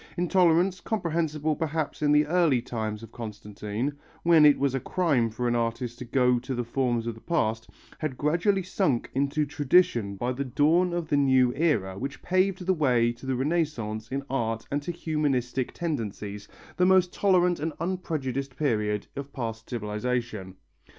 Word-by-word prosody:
Intolerance, 180 +1 +3
comprehensible 160 -6 -1
perhaps 160 -1 -3
in 145 -1 +3
the 150 0 +5
early 165 -5 +3
times 110 -2 -4
of 115 - -11
Constantine, 105 +3 -5 0.3
when 165 -3 +7
it 145 - +5
was 140 -2 +1
a 135 - 0
crime 140 -7 +1
for 120 +3 -3
an 120 - +1
artist 120 +1 -2
to 125 - -6
go 125 0 +2
to 130 +2 -4
the 120 - -1
forms 120 -1 -1
of 115 - -2
the 110 - -15
past, 110 -10 -1 0.3
had 150 -5 -3
gradually 175 +6 +1
sunk 170 - 0
into 140 +3 +1
tradition 145 - +2
by 120 +5 -2
the 130 +2 -2
dawn 155 +7 +2
of 170 -2 -2
the 145 - +2
new 130 -3 +4
era 105 - 0
which 140 +2 -6
paved 185 0 +1
the 190 - +3
way 125 -8 +2
to 120 +3 -11
the 130 - 0
Renaissance 130 -7 -1
in 135 +1 -2
art 115 -4 -2
and 145 +1 0
to 160 - -4
humanistic 135 -7 -1
tendencies, 105 - -4 0.3
the 180 - +4
most 185 -1 +4
tolerant 180 -3 +3
and 160 +2 -2
unprejudiced 140 -7 -3
period 105 -7 0
of 140 0 -6
past 115 -3 -5
civilization. 110 -3 -3
135 Hz, 170 wpm, -27 LUFS, 115-160 Hz, 0.3 s, when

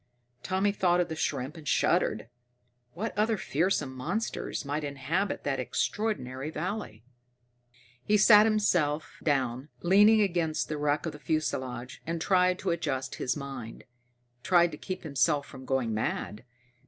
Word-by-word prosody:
Tommy 190 +5 +1
thought 180 -3 +2
of 175 -1 0
the 160 - -4
shrimp, 140 -2 -2
and 155 -3 -11
shuddered. - - +1 0.7
What 215 +6 -4
other 215 +1 +1
fearsome 155 -5 0
monsters 170 - -3
might 145 +2 -2
inhabit 145 +8 -2
that 140 -2 -1
extraordinary 135 - -2
valley? 155 - -5 1.0
He 210 - +3
sat 210 +1 +7 0.7
down, 135 -2 0
leaning 205 +5 +6
against 170 -5 0
the 155 -1 -3
wreck 150 +1 0
of 165 - -2
the 150 - -11
fuselage, 130 -6 -3
and 165 0 -2
tried 180 +1 +3
to 185 -1 -1
adjust 145 -6 -2
his 125 +1 0
mind, 135 -5 -7 0.6
tried 175 +1 +4
to 150 - -7
keep 185 0 -5
himself 145 0 +1
from 130 -1 -11
going 130 -4 0
mad. 110 +1 -3
155 Hz, 140 wpm, -29 LUFS, 135-185 Hz, 1.0 s, sat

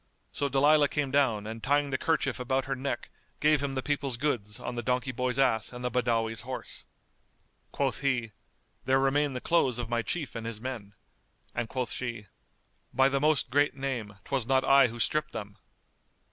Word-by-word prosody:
So 140 - -1
Dalilah 145 +2 +4
came 145 -3 -1
down 125 -7 +2
and 110 +1 -6
tying 145 +2 +1
the 130 - +1
kerchief 145 -6 0
about 130 +1 0
her 135 0 -2
neck 130 -2 -4 0.3
gave 150 -1 +4
him 140 -1 -2
the 130 - -2
people's 140 -4 -1
goods 120 -7 -2
on - - -4
the 120 - -3
donkey 125 +2 0
boy's 125 +1 -1
ass 115 -5 +2
and 125 0 -7
the 125 - 0
Badawi's 115 -3 0
horse. - - -7 0.8
Quoth 135 -2 0
he, 125 -6 0 0.5
"There 130 +1 +4
remain 135 +1 +2
the 125 - -3
clothes 135 -8 +2
of 120 -2 -4
my 120 -1 +1
Chief 150 +3 -3
and 115 -1 -5
his 115 -2 -4
men"; 110 -5 -6 0.6
and 120 -2 -2
quoth 125 -4 -2
she, 115 -4 -4 0.7
"By 135 0 +4
the 140 0 0
Most 150 -4 +2
Great 145 +1 +3
Name, 125 -7 -3
'twas 135 -4 -2
not 130 0 +3
I 135 -1 +6
who 120 0 -8
stripped 155 +5 0
them!" 105 -3 -7
130 Hz, 190 wpm, -29 LUFS, 115-140 Hz, 0.8 s, I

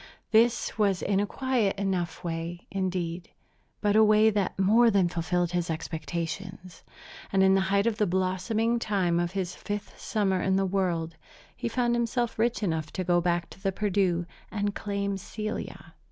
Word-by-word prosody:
This 230 0 +3
was 200 -3 +2
in 195 -1 +1
a 205 - 0
quiet 245 -7 0
enough 185 -4 -2
way, 170 +1 -4
indeed, 180 -3 -2 0.5
but 205 -1 +2
a 220 - +7
way 215 +1 +5
that 200 -2 -1
more 220 +5 +5
than 195 -4 +3
fulfilled 175 +1 -1
his 175 -1 -1
expectations; 170 +3 -5 0.5
and 190 0 +4
in 190 0 +5
the 195 - +4
height 200 +1 +3
of 230 -1 0
the 210 - +3
blossoming 190 +6 0
time 190 -6 +1
of 175 +1 -1
his 185 -2 -2
fifth 205 0 -6
summer 195 -4 0
in 190 0 +1
the 195 0 +2
world 175 -4 -1 0.4
he - - -3
found 240 0 +1
himself 235 -1 -1
rich 235 0 +1
enough 160 -5 -1
to 185 - -2
go 175 0 +2
back 175 0 0
to 190 - -14
the 195 -1 0
Perdu 190 -3 +1 0.2
and 205 -1 -1
claim 200 -1 -2
Celia. 215 +2 -6
195 Hz, 170 wpm, -28 LUFS, 175-210 Hz, 0.5 s, a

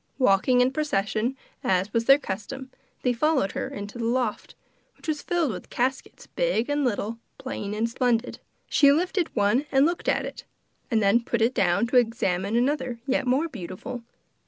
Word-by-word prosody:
Walking 250 +1 +4
in 250 +1 +3
procession, 250 -3 -1 0.3
as 190 +2 +1
was 230 0 +1
their 275 +2 +8
custom, 260 +3 -6 0.3
they 250 - +2
followed 270 -5 +1
her - - -3
into 205 +3 -7
the - - -2
loft, 240 -2 -1 0.4
which - - -14
was 305 -2 -1
filled 340 -6 0
with 180 -3 -8
caskets 260 +2 -2
big - - 0
and 290 0 +1
little, 230 -2 -1 0.2
plain 210 -6 -5
and 225 +2 0
splendid. 240 0 0 0.3
She 280 -1 +5
lifted 350 +3 +1
up - - -31
one 235 +7 +2
and 270 +1 +5
looked 345 +2 -1
at - - +1
it, - - -8 0.5
and 225 -4 +2
then 200 +4 +4
put 235 - -1
it 240 +3 +2
down 195 +1 +2
to 250 +2 +2
examine 215 -4 +1
another 255 -1 0
yet 270 -1 0
more 270 +6 +2
beautiful. 210 - -7
245 Hz, 180 wpm, -26 LUFS, 210-270 Hz, 0.5 s, their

